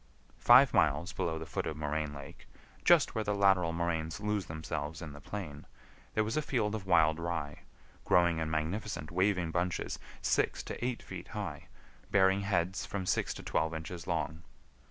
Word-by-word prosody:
Five 130 +2 +7
miles 75 +3 +2
below 80 -1 -1
the 80 - -6
foot - - -3
of 75 - -4
Moraine 75 0 -2
Lake, 70 -1 -11 0.4
just - - +5
where 110 - -1
the 105 -1 -1
lateral 95 -4 +4
moraines 85 +1 -2
lose 105 -2 -1
themselves 80 0 -4
in 80 -4 -7
the 75 - -11
plain, 75 -8 -7 0.5
there 110 - +3
was 110 +2 -2
a 155 - +2
field 115 -8 0
of 105 -3 -5
wild 80 -3 +4
rye, 80 -3 -3 0.4
growing 85 -2 +3
in 80 -1 -1
magnificent 80 +1 -3
waving 90 -2 +1
bunches 90 0 -1 0.2
six - - +1
to - - -6
eight 125 -1 -2
feet - - -8
high, - - -5 0.4
bearing 95 0 +4
heads 95 -1 0
from 95 -2 -4
six - - +1
to - - -8
twelve 80 0 0
inches 80 +2 -6
long. 80 +2 -2
85 Hz, 175 wpm, -32 LUFS, 80-100 Hz, 0.5 s, Five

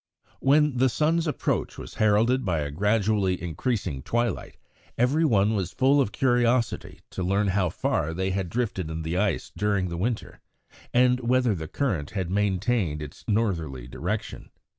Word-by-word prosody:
When 145 0 +3
the 130 +1 +4
sun's 160 +5 +1
approach 150 - -1
was - - -8
heralded 110 +5 +3
by 85 -6 0
a 70 -1 -3
gradually 105 +1 +1
increasing 90 - -2
twilight, 120 - -2 0.4
every 135 +7 +2
one 110 -7 +3
was 95 -5 -2
full 140 +2 +4
of 105 - -1
curiosity 120 -2 +1
to - - -5
learn 100 +3 +1
how 95 -1 +1
far 80 -1 -1
they 95 +3 -1
had 95 -2 -2
drifted 100 -6 -2
in 80 0 -4
the 80 +2 -2
ice 95 -4 0
during 100 -3 0
the 85 - -4
winter, 115 +2 -3 0.5
and 125 0 +4
whether 125 -1 +2
the 80 -4 -5
current 90 - -1
had 90 -2 -2
maintained 100 -4 0
its 75 -1 -9
northerly 85 - -1
direction. - - -4
105 Hz, 160 wpm, -26 LUFS, 90-125 Hz, 0.5 s, the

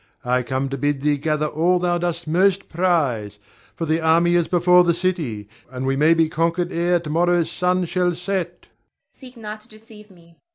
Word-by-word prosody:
I 125 +1 +1
come 130 +2 -2
to 135 0 -5
bid 145 0 -1
thee 145 0 +1
gather 150 +1 -1
all 165 +4 +1
thou 175 -1 0
dost 170 -1 -3
most 190 +4 +1
prize, 145 - 0 0.4
for 165 - -3
the 160 +1 0
army 165 +2 +3
is 175 -2 +2
before 180 0 +4
the 170 -1 +1
city, 160 - -3 0.2
and 130 0 -5
we 135 0 0
may 155 +4 +4
be 165 -1 +2
conquered 165 +3 -1
ere 175 +1 +1
to 165 -2 -8
morrow's 175 +1 +1
sun 180 0 0
shall 175 0 0
set. 185 0 -4
Zara. - - -24 0.4
Seek 255 -2 -15
not 215 -1 -8
to - - -17
deceive 215 -1 -16
me. 170 -3 -21
170 Hz, 200 wpm, -21 LUFS, 150-180 Hz, 0.4 s, before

